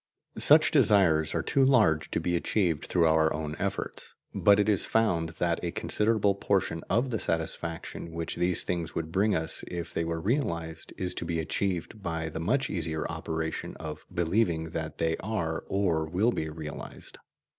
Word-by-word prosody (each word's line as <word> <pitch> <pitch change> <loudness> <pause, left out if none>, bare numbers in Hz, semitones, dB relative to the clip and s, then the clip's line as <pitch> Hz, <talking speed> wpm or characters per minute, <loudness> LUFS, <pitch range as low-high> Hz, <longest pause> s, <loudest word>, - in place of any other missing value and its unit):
Such - - +6
desires 80 -7 +4
are - - 0
too 135 - +2
large 105 - +4
to - - -1
be 85 - 0
achieved 85 -3 0
through 85 -2 +2
our 80 0 +4
own 75 -1 -3
efforts. - - -4 0.2
But 100 0 +5
it 105 - +2
is 105 -3 +3
found 90 -8 +1
that 85 -1 0
a 85 - 0
considerable 105 +2 +2
portion 95 -4 0
of 125 +3 +1
the 110 - -1
satisfaction 85 +1 -3
which 80 0 -4
these 90 0 +1
things 85 -2 -3
would 80 -1 -3
bring 100 +4 +2
us 80 0 -2
if 85 -1 -5
they - - 0
were 85 0 -2
realized 85 - -2
is 90 -1 -2
to - - -4
be 85 -1 -1
achieved 95 +5 -2
by 80 -3 -3
the 80 - -5
much 130 +11 +1
easier 80 -3 -2
operation 80 -1 -4
of 75 -2 -7
believing 85 -2 0
that 80 -2 -4
they 80 0 0
are 85 -6 -3
or 85 -5 +1
will 95 +9 +2
be 80 -8 -3
realized. 75 -2 -6
85 Hz, 175 wpm, -28 LUFS, 80-100 Hz, 0.2 s, Such